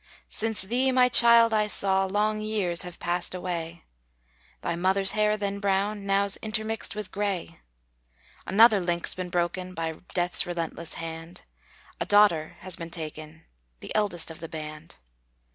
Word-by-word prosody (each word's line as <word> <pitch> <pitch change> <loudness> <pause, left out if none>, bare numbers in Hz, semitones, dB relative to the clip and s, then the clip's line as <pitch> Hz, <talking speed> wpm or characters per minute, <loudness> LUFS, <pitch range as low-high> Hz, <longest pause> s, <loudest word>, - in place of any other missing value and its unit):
Since 220 -2 -1
thee, 250 +6 +1
my 255 -1 +4
child, 235 -1 +7
I 210 -1 +2
saw, 195 -2 +3
Long 210 +2 0
years 205 -5 +1
have 180 -1 -6
passed 175 +1 -3
away; 170 -2 -5 0.8
Thy 170 - -2
mother's 190 +2 +3
hair 215 0 +1
then 200 -1 -3
brown, 200 +1 -1
Now's 195 0 +2
intermixed 220 0 -4
with 210 -3 -6
gray. 200 -3 -3 0.9
Another 215 +1 +6
link's 175 -1 -2
been 185 -1 -6
broken, 180 +1 -2
By 160 -1 -4 0.2
death's 175 -1 +3
relentless 170 -1 -4
hand; 165 +1 -8 0.6
A - - -3
daughter 205 -7 +3
has 185 -2 -4
been 165 0 -7
taken, 155 -1 -8 0.4
The - - -7
eldest 190 -6 0
of 160 - -11
the 165 - -8
band. 155 0 -9
190 Hz, 145 wpm, -26 LUFS, 170-210 Hz, 0.9 s, child